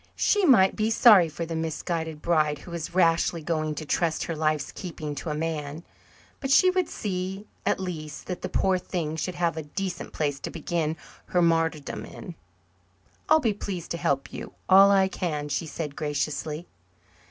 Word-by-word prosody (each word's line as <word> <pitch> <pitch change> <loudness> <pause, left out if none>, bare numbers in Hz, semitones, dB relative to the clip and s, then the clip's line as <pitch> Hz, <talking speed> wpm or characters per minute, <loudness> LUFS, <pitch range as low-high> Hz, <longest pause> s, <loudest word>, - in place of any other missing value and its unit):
She 410 -2 +3
might 190 -9 +6
be 215 +1 +1
sorry 215 -6 +7
for 165 +2 -4
the 165 0 -4
misguided 160 -1 -3
bride 155 -3 +2
who 170 - -12
was 170 0 -5
rashly 165 -2 +3
going 155 -1 -1
to 155 - -5
trust 165 +1 0
her 165 - -3
life's 155 -1 0
keeping 155 -5 -6
to 150 +3 -5
a 150 - -1
man, 155 0 -3 0.6
but 270 - -4
she 370 +7 +6
would 365 -2 0
see, 190 0 -4 0.2
at - - +2
least, 155 -5 -6
that 180 -1 -5
the - - -4
poor 190 -1 +2
thing 165 -4 -3
should 180 +3 -3
have 170 -2 0
a - - -2
decent 180 +5 -5
place 145 -3 -1
to - - -5
begin 165 -1 -2 0.3
her 180 - +2
martyrdom 165 -3 0
in. 180 - -9 1.0
"I'll 315 +1 +7
be 230 -8 +1
pleased 190 -4 -6
to 170 - -1
help 140 -4 -1
you - - -7
all 195 +1 +8
I 195 -1 +5
can," 150 -6 -3
she 160 +3 -2
said 150 -2 -5
graciously. 150 +2 -2
165 Hz, 180 wpm, -26 LUFS, 155-185 Hz, 1.0 s, all